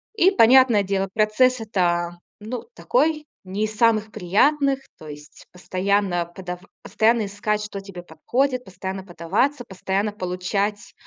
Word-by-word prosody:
И, 380 -2 +5
понятное 245 - +6
дело, 195 0 -1
процесс 235 +4 +3
это, 175 -5 -1 0.2
ну, 225 +4 -6
такой- 315 -13 0 0.2
не 195 +3 -2
из 215 0 -2
самых 220 -2 +2
приятных, 270 - +2 0.2
то 155 - -11
есть 150 0 -12
постоянно 185 0 0
подав 180 -2 -6 0.2
постоянно 225 0 +2
искать, 210 +1 -2
что 210 -1 -6
тебе 195 -3 -10
подходит, 250 - -1
постоянно 190 +1 -6
подаваться, 195 - -1
постоянно 195 0 -2
получать: 195 +2 -3
205 Hz, 130 wpm, -23 LUFS, 185-235 Hz, 0.2 s, понятное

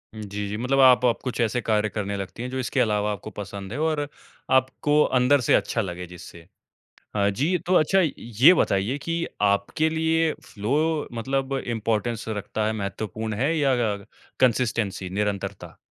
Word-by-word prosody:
उ, 110 - -8
जी, 100 0 -4
जी। 105 - -3
मतलब 125 +4 0
आप 130 -2 +7
आप 120 - +2
कुछ 125 -2 -4
ऐसे 120 +1 +1
कार्य 110 -1 +1
करने 100 -1 -3
लगती 100 +5 -6
हैं 125 - -4
जो 130 0 -4
इसके 125 - -1
अलावा 105 -1 +1
आपको 105 +1 -6
पसंद 100 0 -7
है, 130 - -4
और 155 -2 0 0.4
आपको 130 +3 +3 0.2
अंदर 130 +2 +4
से - - +4
अच्छा 115 - 0
लगे 90 -2 -5
जिससे। 85 -1 -12 0.7
अ, 100 -1 +3
जी, 150 - +1
तो 180 +3 -1
अच्छा 185 +4 +4 0.2
ये 120 - +5
बताइए 110 - +1
कि 170 0 -1 0.2
आपके 100 +10 +2
लिए 160 0 +1
फ़्लो 150 +9 -1
मतलब 135 +2 -1
इम्पोर्टेंस 115 0 -1
रखता 105 0 -3
है 110 - 0
महत्वपूर्ण 110 +1 -4
है, 140 +9 +1
या 140 -3 +2
अग 125 - +1
अग 100 -1 -8 0.3
कंसिस्टेंसी, 115 -7 +1
निरंतरता? 100 0 -3
115 Hz, 175 wpm, -24 LUFS, 105-135 Hz, 0.7 s, आप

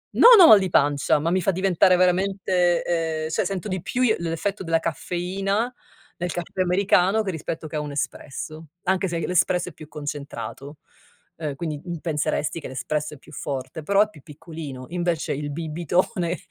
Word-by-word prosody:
non 480 -1 +9
ho 350 - +10
mal 215 - +10
di 190 -1 -1
pancia, 145 -3 +3
ma 165 +3 0
mi 185 +1 +2
fa 185 - +2
diventare, 185 0 +3
ehm, 175 -3 +1
cioè, 160 - 0
sento 195 +1 -3
di 185 -2 -2
più 255 +7 -1
l'effetto 170 +4 -3
della 165 0 +2
caffeina 195 +7 -2 0.4
nel 175 0 -3
caffè 175 +2 -3
americano 190 +3 +3
che 195 - -2
rispetto 160 0 -5
che 155 - -8
a - - 0
un 150 -1 -5
espresso, 155 +2 -5 0.2
anche 190 +1 +1
se 170 -1 -2
l'espresso 180 0 +1
è - - -15
più 155 +1 -12
concentrato. 145 -2 -7 0.6
Ehm, 150 -4 -4
quindi, 155 -1 -4
uhm 175 -2 -5
penseresti 155 0 -1
che - - -7
l'espresso 150 +3 -3
è - - -10
più - - -17
forte, 140 +3 -5
però 200 +5 +3
è 215 - +2
più 155 -9 -16
piccolino. 150 -3 -8
Invece, 175 -2 -1
il 145 +1 -4
bibitone 170 +3 -1
170 Hz, 175 wpm, -24 LUFS, 150-185 Hz, 0.6 s, ho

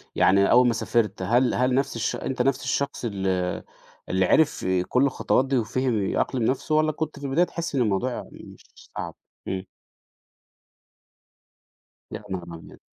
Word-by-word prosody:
يعني 100 +1 +4
أول 125 +1 +6
ما 120 - +2
سافرت 110 -3 0
هل 120 +6 +2
هل 125 +1 +1
نفس 135 +1 0
الش 115 - -1
أنت 130 -1 -3
نفس 135 +2 +1
الشخص 140 -3 -2
ال 100 -4 -3 0.8
اللي 95 0 +2
عرف 155 - +2 0.2
كل 125 +2 +3
الخطوات 135 -1 +1
دي، 135 0 0
وفِهم 120 -1 0
يأقلم 125 -3 0
نفسه، 135 +6 0
والّا 155 0 +3
كنت 155 -1 -5
في 140 - -7
البداية 140 +6 +2
تحس 170 -4 -5
إن 130 - +2
الموضوع 115 +3 0
مش - - -12 0.2
مش - - -17
صعب؟ - - -5 0.3
إمم. 95 0 -3 2.5
يا - - -7
نهار 95 -2 -4
ابيض! 80 - -12
125 Hz, 160 wpm, -25 LUFS, 105-140 Hz, 2.5 s, أول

